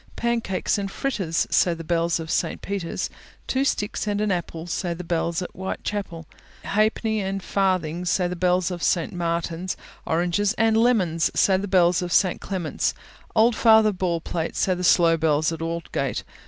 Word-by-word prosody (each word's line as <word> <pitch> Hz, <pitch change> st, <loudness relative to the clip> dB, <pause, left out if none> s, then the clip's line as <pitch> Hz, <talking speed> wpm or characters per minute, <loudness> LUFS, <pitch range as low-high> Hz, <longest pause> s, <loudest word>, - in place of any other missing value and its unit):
Pancakes 230 Hz, -4 st, -1 dB
and 195 Hz, -1 st, -3 dB
fritters, 195 Hz, -9 st, -1 dB
Say 175 Hz, -2 st, +3 dB
the 165 Hz, -, -8 dB
bells 170 Hz, 0 st, 0 dB
of 160 Hz, -1 st, -5 dB
St. -, -, -1 dB
Peter's. 195 Hz, -4 st, -3 dB, 0.4 s
Two 265 Hz, +1 st, 0 dB
sticks 210 Hz, -5 st, -1 dB
and 205 Hz, 0 st, 0 dB
an 210 Hz, -1 st, +1 dB
apple, 170 Hz, -2 st, -3 dB
Say 175 Hz, 0 st, -2 dB
the 180 Hz, -, -7 dB
bells 170 Hz, 0 st, -1 dB
at -, -, -7 dB
Whitechapel. 190 Hz, -2 st, -5 dB, 0.4 s
Halfpence 215 Hz, +1 st, +1 dB
and 195 Hz, 0 st, -3 dB
farthings, 180 Hz, -3 st, 0 dB
Say 180 Hz, -1 st, +2 dB
the 180 Hz, -, -4 dB
bells 180 Hz, +1 st, +1 dB
of 175 Hz, -1 st, -5 dB
St. 170 Hz, -2 st, +1 dB
Martin's. 170 Hz, +1 st, -2 dB, 0.3 s
Oranges 175 Hz, +5 st, +1 dB
and 225 Hz, 0 st, +2 dB
Lemons, 200 Hz, -9 st, +2 dB
Say 190 Hz, -1 st, +4 dB
the 200 Hz, +2 st, -3 dB
bells 180 Hz, -2 st, +3 dB
of 175 Hz, -1 st, -4 dB
St. 185 Hz, 0 st, +2 dB
Clement's. 180 Hz, -5 st, -2 dB, 0.4 s
Old 225 Hz, +1 st, +4 dB
Father 220 Hz, -2 st, +5 dB
Baldpate, 170 Hz, -3 st, -2 dB
Say 185 Hz, -, +1 dB
the 180 Hz, 0 st, -4 dB
slow 170 Hz, -1 st, +5 dB
bells 155 Hz, -1 st, +2 dB
at 165 Hz, -1 st, -5 dB
Aldgate. 165 Hz, -5 st, -3 dB
180 Hz, 170 wpm, -24 LUFS, 170-200 Hz, 0.4 s, Father